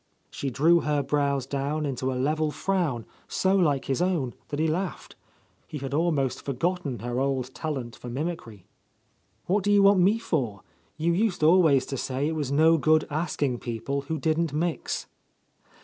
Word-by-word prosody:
She 140 - -3
drew 160 +7 +4
her 150 -3 0
brows 140 -3 0
down 140 +3 -2
into 130 -1 -2
a 130 - -3
level 155 +4 +1
frown 155 - -1 0.2
so 190 +1 +1
like 145 -8 +2
his 135 +5 -1
own 170 -9 0
that 145 - -4
he 160 - +2
laughed. 175 +4 -3 0.5
He 150 - -6
had 135 -1 -5
almost 150 -5 0
forgotten 145 0 -2
her 120 +1 -2
old 130 -1 -1
talent 135 -7 -4
for 125 - -8
mimicry. 125 - -5 0.8
"What 195 +2 +1
do 205 - +2
you 205 -1 +5
want 200 -1 +6
me 195 +5 +4
for? 125 - -2 0.3
You 165 +2 +1
used 195 -3 0
always 155 -5 +5
to 135 - -4
say 135 +3 -2
it 160 - -1
was 145 -4 -2
no 160 +3 +5
good 155 +1 +3
asking 145 -5 -1
people 125 +4 -3
who 160 +3 -3
didn't 160 +2 0
mix. 165 +2 -2
150 Hz, 170 wpm, -26 LUFS, 135-170 Hz, 0.8 s, want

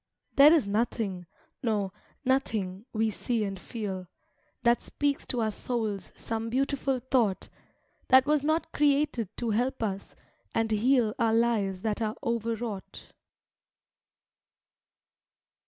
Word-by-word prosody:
There 285 +2 +9
is 315 -10 +4
nothing, 200 -4 -1 0.3
no, 205 -6 0 0.3
nothing, 220 -6 0
we 220 0 +1
see 230 +1 -1
and 195 -2 -4
feel. 195 -6 -5 0.6
That 235 0 +4
speaks 285 -1 -2
to 245 - -1
our 220 -1 +1
souls 215 -3 -3
some 225 0 -4
beautiful 270 +1 0
thought, 245 -6 0 0.6
That 260 0 +7
was 300 -1 +2
not 315 +2 0
created 285 -7 +2
to 235 -2 -1
help 245 +3 0
us, 200 -2 -4 0.4
and 225 -1 +1
heal 225 0 +3
Our 225 -1 +3
lives 215 -5 +1
that 220 0 -1
are 215 -1 -1
overwrought. 230 -3 -3
230 Hz, 120 wpm, -28 LUFS, 210-260 Hz, 0.6 s, There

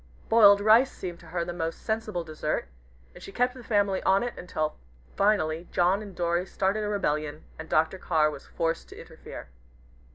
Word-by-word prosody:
Boiled 205 -3 +7
rice 225 +5 +5
seemed 175 -2 -7
to 170 - -15
her 170 +1 -2
the 175 - -5
most 165 -1 -4
sensible 220 -5 -2
dessert, 155 - -3 0.5
and - - -13
she - - -9
kept 250 +3 +1
the 250 -1 -11
family 205 -4 +1
on 195 +3 +3
it 245 - -3
until 155 -3 -3 0.4
finally 175 -5 +1
John 180 +4 +2
and 200 -3 -10
Dorry 175 +1 0
started 200 +3 0
a - - -2
rebellion, 150 -6 -2 0.2
and 160 - -8
Dr. 160 +4 +1
Carr 155 -4 +2
was - - -10
forced 165 0 -2
to - - -11
interfere. 70 - -11
180 Hz, 185 wpm, -27 LUFS, 160-205 Hz, 0.5 s, Boiled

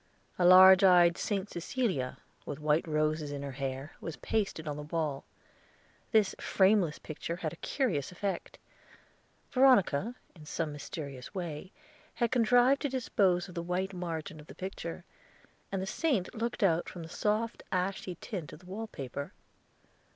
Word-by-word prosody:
A 180 - +4
large 185 +2 +9
eyed 175 -2 +6
Saint 200 +1 -2
Cecilia, 170 - -2 0.3
with 145 - -5
white 155 +2 +1
roses 155 -1 0
in 140 -1 -5
her 140 - -4
hair, 135 +2 -4
was 165 - -5
pasted 195 -7 -2
on 145 - -2
the 150 - -6
wall. 150 -2 -3 0.9
This 215 -4 +4
frameless 190 -5 +3
picture 165 +2 -5
had 165 -3 -4
a - - -11
curious 185 - -1
effect. 185 0 -4 0.9
Veronica, 245 - +4 0.2
in 155 -3 -13
some 160 0 -2
mysterious 140 0 -7
way, 175 0 -5 0.4
had 235 -2 0
contrived 245 +2 +4
to 285 - 0
dispose 195 -8 +1
of 180 - -11
the 170 - -3
white 180 +3 -2
margin 165 -3 -5
of 150 - -13
the - - -11
picture, 190 +1 -6 0.7
and 195 -1 -1
the - - -2
saint 215 - 0
looked 235 0 -2
out 170 -3 +2
from 175 - -8
the - - -8
soft 215 +6 -1
ashy 185 0 -2
tint 180 - -6
of 155 - -12
the - - -18
wallpaper. 180 - -6
180 Hz, 155 wpm, -31 LUFS, 155-205 Hz, 0.9 s, large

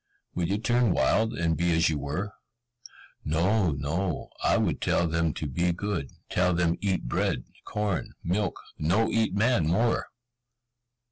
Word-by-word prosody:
Would 85 -1 -1
you 100 - +1
turn 120 -2 +2
wild, 110 +2 +2
and 85 -3 0
be 85 +1 +1
as 85 +1 +4
you 75 -2 0
were?" 85 +10 -3 0.9
"No, 90 +5 +2
no, 75 +5 -2
I - - +4
would - - 0
tell 85 - +2
them 80 0 +1
to - - -4
be 85 +6 0
good, 90 -5 -3 0.2
tell 90 -1 +2
them 85 -1 +2
eat 95 -2 0
bread, - - -1 0.2
corn, 105 -4 -2
milk, 95 +3 -1 0.2
no 105 +8 +2
eat 110 -4 +1
man 105 -6 +2
more!" 115 +8 +1
90 Hz, 150 wpm, -27 LUFS, 80-105 Hz, 0.9 s, as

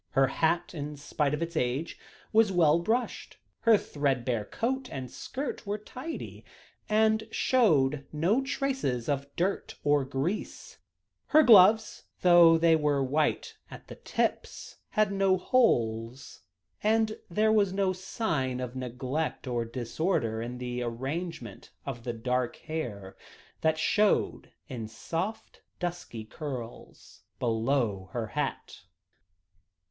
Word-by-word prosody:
Her 135 - +5
hat, 165 +6 0
in 150 -2 -5
spite 145 0 -1
of 150 - -3
its 170 0 -6
age, 135 +4 -1 0.3
was 220 -2 +5
well 165 -3 +4
brushed; 230 +8 -2 0.2
her 230 -2 +5
threadbare 130 - -1
coat 255 - -2
and 130 -4 -6
skirt 270 -5 -5
were 205 +1 -1
tidy, 255 +9 -8 0.5
and 220 0 +2
showed 150 - +2
no 175 - +2
traces 265 - -2
of 140 -1 -1
dirt 185 +3 -1
or 145 -1 +3
grease; 135 +9 -4 0.5
her 310 0 +6
gloves, 215 -1 +6 0.2
though 175 -2 +7
they 165 0 +4
were 145 -3 +1
white 145 +4 0
at - - -12
the - - -7
tips, - - -3
had 215 -2 +2
no 195 -1 +2
holes; 120 - 0 0.4
and 220 0 +1
there 215 +5 +2
was 205 -3 +3
no 190 -1 +1
sign 165 - -2
of 125 0 -5
neglect 130 +6 -3
or 120 -2 -1
disorder 120 - -1
in 120 +2 -5
the 125 0 -4
arrangement 130 - -5 0.2
of 120 -4 -6
the 120 - -2
dark 125 +1 -1
hair, 110 -12 -6 0.5
that 160 0 +2
showed 205 +6 +1 0.2
in 115 -4 -6
soft, 185 - -5 0.2
dusky 175 -10 -5
curls 125 -3 -8 0.2
below 115 -5 0
her 120 -2 -2
hat. 145 -2 -4
150 Hz, 125 wpm, -29 LUFS, 125-195 Hz, 0.5 s, though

